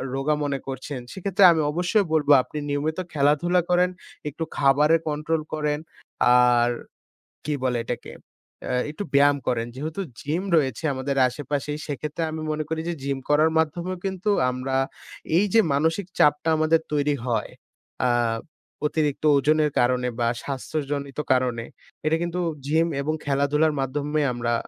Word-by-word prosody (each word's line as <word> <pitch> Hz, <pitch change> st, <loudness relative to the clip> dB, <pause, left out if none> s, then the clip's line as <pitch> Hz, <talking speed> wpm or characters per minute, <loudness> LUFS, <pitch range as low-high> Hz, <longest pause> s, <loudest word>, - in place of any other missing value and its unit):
রোগা 145 Hz, +3 st, +1 dB
মনে 140 Hz, -1 st, -1 dB
করছেন। 135 Hz, 0 st, -5 dB
সেক্ষেত্রে 195 Hz, 0 st, +1 dB
আমি 160 Hz, -2 st, +2 dB
অবশ্যই 180 Hz, +5 st, +1 dB
বলবো 145 Hz, -2 st, +3 dB
আপনি -, -, -9 dB
নিয়মিত 145 Hz, +2 st, -1 dB, 0.2 s
খেলাধুলা 155 Hz, +5 st, +3 dB
করেন, 180 Hz, 0 st, +3 dB, 0.4 s
একটু 160 Hz, +3 st, -5 dB
খাবারে 150 Hz, +3 st, +4 dB
কন্ট্রোল 155 Hz, +2 st, -1 dB
করেন। 150 Hz, -1 st, -1 dB, 0.6 s
আর 120 Hz, -1 st, +4 dB, 0.8 s
কি 150 Hz, -, -1 dB
বলে 125 Hz, -2 st, +1 dB
এটাকে? 120 Hz, +1 st, -5 dB, 0.5 s
এ্যা -, -, -3 dB, 0.2 s
একটু 180 Hz, +7 st, -5 dB
ব্যায়াম 145 Hz, 0 st, +5 dB
করেন। 115 Hz, -2 st, 0 dB
যেহেতু 155 Hz, +7 st, -4 dB, 0.2 s
জিম 160 Hz, +6 st, -2 dB
রয়েছে 135 Hz, -1 st, 0 dB
আমাদের 135 Hz, +1 st, -2 dB
আশেপাশেই 145 Hz, +3 st, -4 dB
সেক্ষেত্রে 150 Hz, +3 st, -3 dB
আমি 160 Hz, -, -5 dB
মনে 155 Hz, 0 st, -2 dB
করি 160 Hz, 0 st, -2 dB
যে -, -, -1 dB
জিম 140 Hz, 0 st, -1 dB
করার 155 Hz, +2 st, +4 dB
মাধ্যমেও 170 Hz, +4 st, -1 dB
কিন্তু 190 Hz, +2 st, -2 dB, 0.2 s
আমরা 130 Hz, +1 st, -3 dB, 0.6 s
এই 200 Hz, -, +4 dB
যে 225 Hz, -, +6 dB
মানসিক 160 Hz, +6 st, +1 dB
চাপটা 150 Hz, +2 st, +4 dB
আমাদের 155 Hz, +1 st, +3 dB
তৈরি 145 Hz, 0 st, +1 dB
হয়। 115 Hz, -4 st, -1 dB, 0.6 s
আ -, -, +2 dB, 0.8 s
অতিরিক্ত 150 Hz, -2 st, -1 dB
ওজনের 150 Hz, +1 st, +2 dB
কারণে 125 Hz, 0 st, +2 dB
বা 115 Hz, -, +2 dB, 0.2 s
স্বাস্থ্যজনিত 140 Hz, 0 st, -4 dB
কারণে 125 Hz, -2 st, 0 dB, 0.4 s
এটা 160 Hz, +1 st, +3 dB
কিন্তু 175 Hz, +1 st, -3 dB, 0.3 s
জিম 160 Hz, +3 st, +3 dB
এবং 155 Hz, +3 st, -1 dB
খেলাধুলার 145 Hz, +2 st, +2 dB
মাধ্যমে 145 Hz, +3 st, -1 dB
আমরা 120 Hz, 0 st, -1 dB
150 Hz, 145 wpm, -24 LUFS, 135-160 Hz, 0.8 s, যে